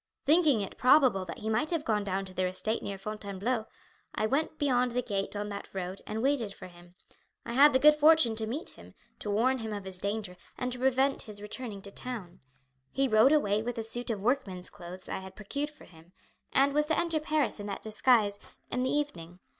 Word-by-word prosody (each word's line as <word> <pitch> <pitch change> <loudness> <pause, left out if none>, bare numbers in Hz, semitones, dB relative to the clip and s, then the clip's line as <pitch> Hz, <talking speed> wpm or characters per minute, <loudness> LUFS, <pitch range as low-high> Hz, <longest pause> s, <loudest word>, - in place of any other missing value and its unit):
Thinking 300 -6 +4
it 195 - -6
probable 250 -7 +5
that 170 - -7
he 215 - -6
might 270 +8 +1
have 330 -3 -1
gone 210 -2 +1
down 195 0 -2
to 185 - -11
their 185 0 0
estate 215 +5 -2
near 200 - -5
Fontainebleau, 215 +3 -3 0.5
I 215 - 0
went 280 +9 0
out - - -32
beyond 250 -3 +2
the 250 0 0
gate 200 -2 -2
on 205 0 -3
that 200 -1 -8
road 185 0 -4
and 220 +2 -3
waited 250 -8 0
for - - -10
him. 175 0 -15 0.5
I 235 - -4
had 285 +4 +7
the 260 - +4
good 300 +3 +7
fortune 300 -6 +5
to 220 -1 0
meet 285 +10 -4
him, - - -16 0.2
to 210 - -5
warn 250 +6 +2
him 220 -1 -5
of 205 -1 -4
his 190 -1 -7
danger, 200 -3 -3 0.2
and 250 0 -2
to 250 - -4
prevent 265 +1 +2
his 210 -2 -5
returning 210 -1 -6
to 200 - -9
town. 200 -7 -6 0.5
He 275 0 +1
rode 220 +3 +5
away 215 -9 +3
with 240 +1 -4
a 225 - -2
suit 240 +2 -3
of 210 -4 -3
workman's 210 -8 -1
clothes 185 -1 -10
I - - -3
had 190 0 -11
procured 280 +8 -3
for 300 - -16
him, 165 +1 -18 0.4
and 275 +1 +3
was 300 +1 +2
to 320 - +2
enter 335 -2 +1
Paris 305 -6 0
in 205 - -6
that 200 - -5
disguise 215 -2 +3 0.3
in 250 - 0
the 260 - +1
evening. 180 - -2
220 Hz, 225 wpm, -30 LUFS, 200-265 Hz, 0.5 s, had